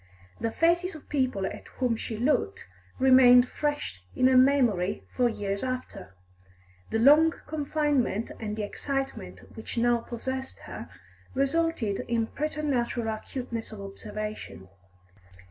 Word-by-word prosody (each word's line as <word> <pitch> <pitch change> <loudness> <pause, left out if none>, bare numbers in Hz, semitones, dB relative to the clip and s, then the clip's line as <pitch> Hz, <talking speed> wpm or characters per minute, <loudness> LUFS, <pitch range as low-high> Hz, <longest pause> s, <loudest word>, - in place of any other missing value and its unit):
The 230 - 0
faces 340 +6 +2
of 310 - -12
people 255 -9 0
at - - -6
whom 250 -3 +1
she 220 0 -5
looked 350 - 0 0.3
remained 255 -1 +7
fresh 295 - -3
in 255 - +2
her 260 0 +5
memory 245 -8 +3
for 245 -1 +3
years 200 -3 -3
after; 255 - -5 0.7
the - - 0
long 300 +7 +6
confinement 290 -7 0
and 210 -2 -4
the 215 - -3
excitement 270 - -5
which 220 +1 -7
now 240 0 +3
possessed 260 +3 -5
her - - -8 0.5
resulted 275 -6 0
in 230 -1 +1
preternatural 265 -5 -2
acuteness 230 +1 -5
of 215 - -8
observation. 205 - -7
250 Hz, 125 wpm, -28 LUFS, 220-280 Hz, 0.7 s, remained